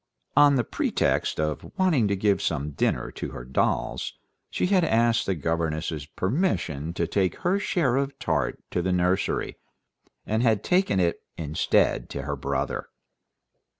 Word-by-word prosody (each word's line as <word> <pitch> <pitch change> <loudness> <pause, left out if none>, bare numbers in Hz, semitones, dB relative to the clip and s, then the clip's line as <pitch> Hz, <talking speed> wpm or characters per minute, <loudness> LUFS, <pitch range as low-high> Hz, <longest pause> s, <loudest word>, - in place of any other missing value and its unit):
On 145 0 +6
the 125 - +2
pretext - - 0
of 75 -1 -3
wanting 160 - +3
to 100 - +1
give 100 -1 +2
some 75 -2 -1
dinner - - -1
to - - -5
her - - -7
dolls, 65 - -1 0.4
she - - -1
had 185 -1 +3
asked 115 -5 +2
the 95 - +1
governess's 80 -1 -2
permission 95 - -1
to 85 - 0
take 95 +2 0
her 185 +3 +2
share 150 -10 +1
of 140 0 -1
tart 75 - -1
to 90 - 0
the 95 +1 0
nursery, 90 +1 0 0.7
and 110 +2 0
had 110 -4 +2
taken 180 - +2
it 85 -2 +1 0.2
instead 80 -1 +1
to 70 - -5
her 70 0 -2
brother. 70 0 -2
95 Hz, 150 wpm, -26 LUFS, 80-130 Hz, 0.7 s, On